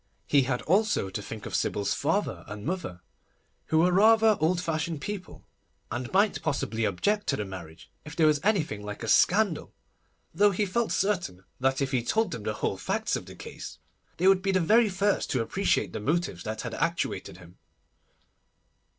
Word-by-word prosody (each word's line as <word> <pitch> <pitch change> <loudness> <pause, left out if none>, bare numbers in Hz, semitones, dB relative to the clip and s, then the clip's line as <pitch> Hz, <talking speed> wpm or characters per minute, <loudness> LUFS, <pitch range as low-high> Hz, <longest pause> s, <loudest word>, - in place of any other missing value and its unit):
He 145 - +4
had 125 -1 -1
also 195 - +1
to 105 - -4
think 105 +1 -8
of - - -7
Sybil's 100 -1 0
father - - -1
and 105 0 -8
mother, 140 - -4 0.6
who 160 - +1
were 175 +3 +4
rather 220 +3 +5
old 170 +3 +2
fashioned 165 -2 -2
people, 200 +3 -7 0.5
and 120 +1 -4
might 200 +3 +2
possibly 115 -8 -1
object 205 - 0
to 135 - +2
the 105 - -3
marriage 85 -4 -10
if 150 +1 -10
there 160 - +3
was 150 -1 +4
anything 170 - 0
like 105 +2 -7
a - - -4
scandal, 185 - +2 0.6
though 205 +1 +5
he 205 +1 0
felt 225 +4 -1
certain 180 - -1 0.2
that 135 +1 +1
if 135 - -3
he 130 -3 +1
told 220 - +1
them 115 - -5
the 105 +1 -2
whole 95 - -2
facts - - -1
of - - -6
the - - -10
case - - -9 0.4
they 185 - +2
would 190 -1 +5
be 195 0 0
the 190 - +2
very 215 +6 +4
first 200 +1 0
to 125 - 0
appreciate 195 - 0
the - - -3
motives 165 +11 -1
that 110 0 -4
had 120 -2 -5
actuated 165 - -2
him. 90 -1 -16
160 Hz, 185 wpm, -27 LUFS, -, 0.6 s, rather